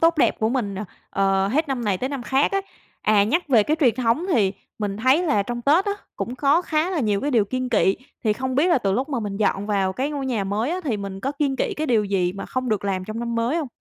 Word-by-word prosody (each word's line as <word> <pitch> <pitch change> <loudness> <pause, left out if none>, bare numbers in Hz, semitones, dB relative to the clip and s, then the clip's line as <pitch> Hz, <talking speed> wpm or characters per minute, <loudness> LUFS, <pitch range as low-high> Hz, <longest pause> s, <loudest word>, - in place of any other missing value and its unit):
tốt 330 -1 +3
đẹp - - +3
của 220 - +1
mình, 230 -6 -1 0.4
ờ, 195 0 +2
hết 300 +7 0
năm 260 -3 -2
này 195 -3 0
tới 260 - -2
năm 275 -3 -4
khác 265 +6 +1
á. 395 - +2 0.4
À, 210 -2 +4
nhắc 315 - 0
về 235 -5 +5
cái 305 +9 0
truyền 245 -6 +4
thống 250 +6 +1
thì 200 - +3 0.3
mình 205 -2 -2
thấy 260 +9 +3
là 215 - +2
trong 240 +3 -5
Tết 310 +9 +4
á, 405 - 0 0.2
cũng 245 - -3
có 290 +6 +3
khá 315 +1 0
là 350 -5 -1
nhiều 210 -5 +1
cái 290 - -1
điều 230 -5 +3
kiêng 255 +4 -3
kị. 205 -5 +3 0.3
Thì 215 - +3
không 260 +4 -3
biết 290 +6 +3
là 340 - +4
từ 200 -5 0
lúc 260 +8 -1
mà 265 -5 -2
mình 205 -2 -4
dọn 200 -1 0
vào 195 -3 +1
cái 265 +8 -2
ngôi 280 -2 -3
nhà 230 -6 -1
mới 210 +7 -1
á, 360 +2 -2
thì 245 -8 0
mình 195 -1 -6
có 270 +7 -2
kiêng 280 -2 -1
kị - - -1
cái 310 - -2
điều 230 -6 +2
gì 190 -3 0
mà 195 - -7
không 255 0 -3
được 215 -3 -1
làm 190 -2 -1
trong 215 +3 -6
năm 235 0 -3
mới 230 +7 0
hông? 310 -5 -2
240 Hz, 280 wpm, -23 LUFS, 205-280 Hz, 0.4 s, về